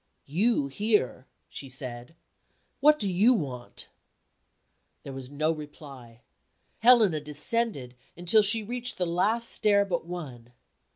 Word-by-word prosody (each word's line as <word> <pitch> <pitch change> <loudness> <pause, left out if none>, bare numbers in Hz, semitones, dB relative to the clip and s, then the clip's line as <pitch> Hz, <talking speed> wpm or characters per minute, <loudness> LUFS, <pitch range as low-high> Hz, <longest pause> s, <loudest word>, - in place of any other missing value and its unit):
"You 190 +2 +1
here?" 205 - -1 0.2
she 135 - -9
said. 125 +2 -7 0.6
"What 300 +2 +5
do 205 - 0
you 205 +7 +4
want?" 130 - -6 1.2
There 140 - -8
was 130 -1 -8
no 155 +3 0
reply. 140 -6 -10 0.6
Helena 225 -9 +5
descended, 150 - -2 0.2
until 175 +5 +4
she 210 +2 +1
reached 245 +3 -5
the 180 - 0
last 210 +7 +1
stair 205 -1 +3
but 175 -3 -3
one. 130 -9 -8
170 Hz, 120 wpm, -27 LUFS, 135-215 Hz, 1.2 s, What